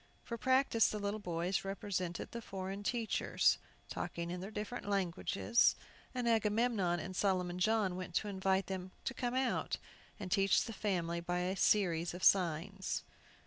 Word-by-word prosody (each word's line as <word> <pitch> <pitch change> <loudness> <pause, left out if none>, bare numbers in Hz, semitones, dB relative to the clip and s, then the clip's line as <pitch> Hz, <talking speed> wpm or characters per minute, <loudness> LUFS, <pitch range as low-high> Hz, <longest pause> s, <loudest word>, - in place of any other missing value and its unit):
For 235 - -4
practice, 260 -1 +3
the 215 - -3
little 205 +1 -2
boys 175 0 -1
represented 195 -3 -3
the 235 - -5
foreign 195 -1 -5
teachers 225 +1 +1 0.3
talking 170 0 -4
in 180 - -4
their 195 - -5
different 215 +1 -5
languages, 195 +4 +2 0.4
and 245 -1 -1
Agamemnon 220 -5 +2
and 185 +2 -6
Solomon 180 -2 +1
John 205 -2 +2
went 180 -2 -6
to 215 - +1
invite 190 -1 +1
them 185 -1 -5
to 265 - -1
come 245 0 -2
out, 260 0 0 0.4
and 190 -3 -6
teach 195 -1 +4
the 225 - -6
family 175 -5 -1
by 175 +1 -1
a 185 +2 -1
series 175 -5 +2
of 180 - -7
signs. 190 +1 +2
195 Hz, 155 wpm, -35 LUFS, 180-215 Hz, 0.4 s, teach